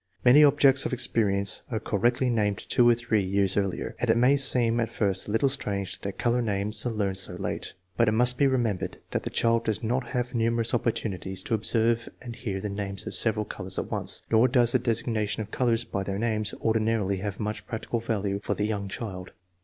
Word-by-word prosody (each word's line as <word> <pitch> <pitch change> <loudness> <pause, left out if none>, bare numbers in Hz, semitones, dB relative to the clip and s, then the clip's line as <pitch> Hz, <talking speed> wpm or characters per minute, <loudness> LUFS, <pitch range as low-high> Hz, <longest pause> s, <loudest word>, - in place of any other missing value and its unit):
Many 135 +5 +7
objects 140 -2 +5
of - - -6
experience 100 -5 +1
are 110 - -2
cor 105 - -3
rectly 125 +2 +2
named 105 -4 0
two 120 +5 +3
or 120 - +5
three 110 -2 0
years 95 0 +1
earlier, 100 -2 -2
and 125 - -1
it 115 - +4
may 125 +4 +4
seem 120 -4 +5
at 115 - -1
first 95 -3 0
a - - -4
little 115 +6 +2
strange 100 -8 -2
that 100 -1 -6
color 120 +1 +1
names 105 -1 -2
are - - 0
learned 100 -4 -2
so - - -2
late. - - -5 0.2
But 115 - +3
it 110 - +2
must 125 +2 +2
be 140 - +4
remembered 120 -7 -1
that - - -1
the - - -5
child 115 0 +1
does 110 +1 -2
not 125 +3 -1
have 125 -1 -3
numerous 115 -1 0
opportunities 95 -5 -2
to - - -3
observe 115 +1 0
and 120 -2 -8
hear 105 -5 -4
the 105 - -4
names 100 -1 -5
of - - -5
several 110 -2 +1
colors 95 -2 -6
at - - -4
once, - - +2
nor 115 +2 +5
does 120 -2 +2
the 130 - +2
designation 115 -2 -1
of 105 - -13
colors 120 -2 +1
by 100 - -4
their 95 0 -3
names 110 -1 -1
ordinarily 110 -3 0
have 100 +1 -5
much 105 0 -4
practical 115 +1 -3
value 100 -3 -2
for - - -2
the 105 - -1
young 105 -2 -3
child. 95 -3 -7
110 Hz, 215 wpm, -26 LUFS, 100-120 Hz, 0.2 s, Many